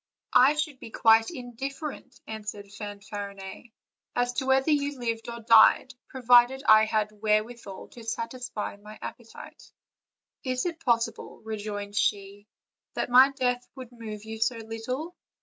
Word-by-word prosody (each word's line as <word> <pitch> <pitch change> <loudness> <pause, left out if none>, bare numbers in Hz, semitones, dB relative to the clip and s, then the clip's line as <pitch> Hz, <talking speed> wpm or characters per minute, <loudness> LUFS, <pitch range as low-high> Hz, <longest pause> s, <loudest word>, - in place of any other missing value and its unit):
"I 300 - +6
should 300 -3 -3
be - - -9
quite 225 0 +4
indifferent," 260 +2 -7
answered 210 -2 -7
Fanfariuet, 205 +1 -8 0.4
"as 245 0 0
to 260 +1 -2
whether 265 +3 +3
you 285 -1 0
lived 230 -2 -3
or 235 0 -7
died, 230 +3 +6 0.2
provided 250 +1 +4
I 215 0 +8
had 215 -1 0
where 215 0 +2
withal 225 -4 -10
to 235 - -12
satisfy 230 -2 -4
my 210 +1 -12
appetite." 235 -2 -10 0.7
"Is 255 -1 -1
it 330 -2 -4
possible," 230 -2 -1
rejoined 205 -2 -5
she, 200 0 -1 0.5
"that - - -2
my 260 +2 +8
death 250 -2 0
would 255 -3 -9
move 220 -3 -8
you 220 0 -7
so 225 +2 +1
little? 230 +9 -5
230 Hz, 140 wpm, -27 LUFS, 215-255 Hz, 0.7 s, I